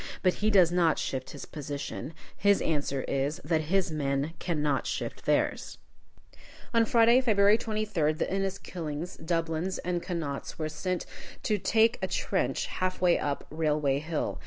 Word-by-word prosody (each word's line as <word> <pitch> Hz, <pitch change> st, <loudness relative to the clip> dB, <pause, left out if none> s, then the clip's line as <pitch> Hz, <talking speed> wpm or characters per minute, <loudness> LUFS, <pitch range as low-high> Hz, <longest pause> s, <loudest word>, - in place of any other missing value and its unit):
But 185 Hz, -1 st, +4 dB
he 215 Hz, -, +3 dB
does 185 Hz, -5 st, +5 dB
not 170 Hz, -3 st, +3 dB
shift 130 Hz, -1 st, -3 dB
his -, -, -8 dB
position. 145 Hz, 0 st, -6 dB, 0.2 s
His 200 Hz, 0 st, +3 dB
answer 140 Hz, -4 st, -1 dB
is, 140 Hz, +3 st, -1 dB
that 160 Hz, -1 st, +1 dB
his 190 Hz, -2 st, +2 dB
men 140 Hz, 0 st, -1 dB
cannot 150 Hz, -5 st, 0 dB
shift -, -, -4 dB
theirs. -, -, 0 dB, 1.0 s
On 230 Hz, -1 st, +4 dB
Friday, 235 Hz, +2 st, +5 dB
February 205 Hz, -4 st, +5 dB
23d, 210 Hz, -9 st, 0 dB
the -, -, +1 dB
Inniskillings, 180 Hz, -4 st, -4 dB
Dublins, 165 Hz, +2 st, -1 dB
and 175 Hz, -1 st, 0 dB
Connaughts 165 Hz, -6 st, -4 dB
were 155 Hz, -2 st, -2 dB
sent 180 Hz, +3 st, -3 dB
out -, -, -14 dB
to 210 Hz, -2 st, +1 dB
take 225 Hz, +4 st, +3 dB
a -, -, 0 dB
trench, -, -, -1 dB
half 185 Hz, 0 st, -2 dB
way 180 Hz, -1 st, +4 dB
up 145 Hz, -1 st, -2 dB
Railway 150 Hz, -3 st, +1 dB
Hill. 155 Hz, +1 st, -3 dB
170 Hz, 155 wpm, -29 LUFS, 150-195 Hz, 1.0 s, does